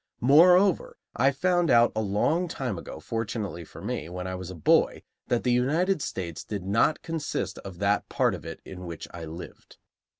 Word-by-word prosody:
Moreover, 180 Hz, +8 st, +5 dB, 0.2 s
I 135 Hz, +3 st, +4 dB
found 175 Hz, +4 st, +1 dB
out, 120 Hz, -1 st, +5 dB
a 110 Hz, -, +1 dB
long 110 Hz, -, +1 dB
time 130 Hz, -, -3 dB
ago, 80 Hz, -, -9 dB
fortunately 105 Hz, -2 st, -4 dB
for -, -, -12 dB
me, 80 Hz, -, -3 dB
when 90 Hz, +1 st, -5 dB
I 95 Hz, -, -4 dB
was 90 Hz, -1 st, -6 dB
a 95 Hz, -, -7 dB
boy, 80 Hz, -, +2 dB, 0.2 s
that 120 Hz, -2 st, 0 dB
the 125 Hz, -, +2 dB
United 155 Hz, +9 st, +2 dB
States 85 Hz, -9 st, -4 dB
did 100 Hz, -3 st, -5 dB
not 115 Hz, +10 st, +2 dB
consist 150 Hz, -, -3 dB
of 95 Hz, -3 st, -9 dB
that 100 Hz, +2 st, 0 dB
part -, -, +2 dB
of -, -, -7 dB
it -, -, -8 dB
in 90 Hz, -1 st, -8 dB
which 85 Hz, -2 st, -7 dB
I 85 Hz, -1 st, -6 dB
lived. 80 Hz, +3 st, -10 dB
110 Hz, 190 wpm, -27 LUFS, 90-150 Hz, 0.2 s, Moreover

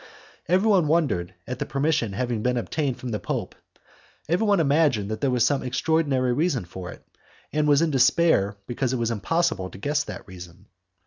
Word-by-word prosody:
Everyone 185 Hz, -1 st, +3 dB
wondered 135 Hz, -, 0 dB
at 125 Hz, +1 st, -5 dB
the -, -, -2 dB
permission 140 Hz, -6 st, 0 dB
having 120 Hz, 0 st, -2 dB
been 125 Hz, +2 st, 0 dB
obtained 135 Hz, +2 st, -2 dB
from 125 Hz, -, -6 dB
the 105 Hz, -2 st, -2 dB
Pope, -, -, -4 dB, 0.7 s
everyone 200 Hz, +4 st, +2 dB
imagined 140 Hz, -9 st, +2 dB
that 110 Hz, -, -4 dB
there 140 Hz, -, +2 dB
was 125 Hz, -2 st, +2 dB
some 145 Hz, -2 st, +1 dB
extraordinary 130 Hz, -1 st, +1 dB
reason 140 Hz, -, 0 dB
for 90 Hz, +1 st, -8 dB
it, -, -, -14 dB, 0.5 s
and 150 Hz, 0 st, +1 dB
was 145 Hz, +2 st, +4 dB
in 165 Hz, -, +1 dB
despair 135 Hz, -6 st, +3 dB
because 125 Hz, +2 st, -2 dB
it -, -, 0 dB
was 115 Hz, -1 st, -1 dB
impossible 140 Hz, -, 0 dB
to -, -, -12 dB
guess 145 Hz, +9 st, 0 dB
that -, -, -8 dB
reason. 90 Hz, 0 st, -12 dB
130 Hz, 180 wpm, -24 LUFS, 110-155 Hz, 0.7 s, was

